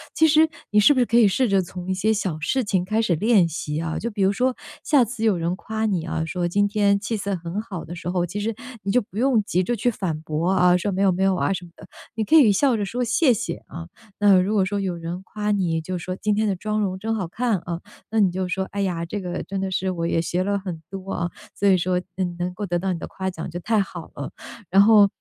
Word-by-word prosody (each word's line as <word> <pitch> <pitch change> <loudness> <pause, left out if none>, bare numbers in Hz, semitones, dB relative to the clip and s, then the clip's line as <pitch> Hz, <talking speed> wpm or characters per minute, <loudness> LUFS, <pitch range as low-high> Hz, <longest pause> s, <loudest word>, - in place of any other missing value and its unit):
其 320 - +5
实， 315 +1 +5 0.2
你 210 - +5
是 255 +8 +6
不 260 - 0
是 245 - +4
可 235 - +2
以 225 - +7
试 250 +6 +2
着 195 - +3
从 180 +1 -7
一 190 - +2
些 210 +4 +1
小 190 -7 -2
事 255 +12 0
情 190 -4 0
开 215 +4 +1
始 190 -6 +1
练 205 0 +4
习 150 -1 -3
啊？ 160 -1 -3
就 235 - -3
比 205 - -4
如 195 - +4
说 255 +4 0 0.3
下 285 -4 +4
次 225 0 -6
有 215 -3 +3
人 170 +2 -1
夸 220 +2 -3
你 175 -5 -1
啊， 160 -1 -2
说 175 +2 -2
今 205 +4 +2
天 200 -1 +2
气 215 +2 -3
色 200 -1 -2
很 175 +3 -5
好 195 -7 -7
的 170 +3 -8
时 170 - -8
候， 180 -1 0
其 195 +4 -5
实 220 +1 -2 0.3
你 195 - -1
就 250 - +3
不 200 0 -12
用 250 -2 +3
急 185 -3 0
着 240 +6 -1
去 235 +3 +1
反 175 -9 -3
驳 160 +3 -1
啊， 180 -1 +4
说： 200 +3 -2
“没 190 - -1
有 195 -1 +4
没 185 +2 0
有 195 -1 +3
啊 185 - 0
“什 180 -2 -5
么 170 - -16
的， - - -14 0.3
你 220 -1 -1
可 310 - +3
以 270 -10 +7
笑 245 +4 +3
着 205 - -1
说： 245 +5 -2
“谢 255 +3 +3
谢” 235 +1 -3
啊。 165 0 -9 0.3
那 200 -3 +6
如 190 +4 0
果 205 -3 +3
说 200 +2 -1
有 190 -3 -2
人 170 +2 -6
夸 210 +2 -4
你， 175 -5 0
就 185 +3 -4
说 185 +1 -5
今 210 +2 0
天 215 +1 +1
的 195 - 0
妆 215 +3 -2
容 185 -2 -2
真 225 +2 -2
好 195 -5 -2
看 225 +4 0
啊， 170 -1 -5 0.3
那 225 - +1
你 200 -3 +5
就 185 0 -2
说： 190 +1 -1
“哎 200 0 -2
呀， 175 -4 -1
这 170 +5 -4
个 180 -2 -4
真 195 0 -4
的 190 0 -2
是 190 +1 -1
我 170 -2 -2
也 165 - +1
学 175 +2 -1
了 200 +1 0
很 185 -4 -6
多 195 0 -6
啊， 170 0 -2 0.2
所 200 - +1
以 190 - +6
说 180 0 +1 0.4
能 180 +1 -3
够 205 +3 -4
得 175 - 0
到 185 +1 -1
你 165 - -5
的 - - -6
夸 190 0 -4
奖 160 -1 -6
就 175 - -5
太 215 +4 +1
好 175 -4 -5
了。 140 - -5 0.4
“然 195 +2 +6
后 210 -1 +7
195 Hz, 300 characters per minute, -23 LUFS, 175-215 Hz, 0.4 s, 以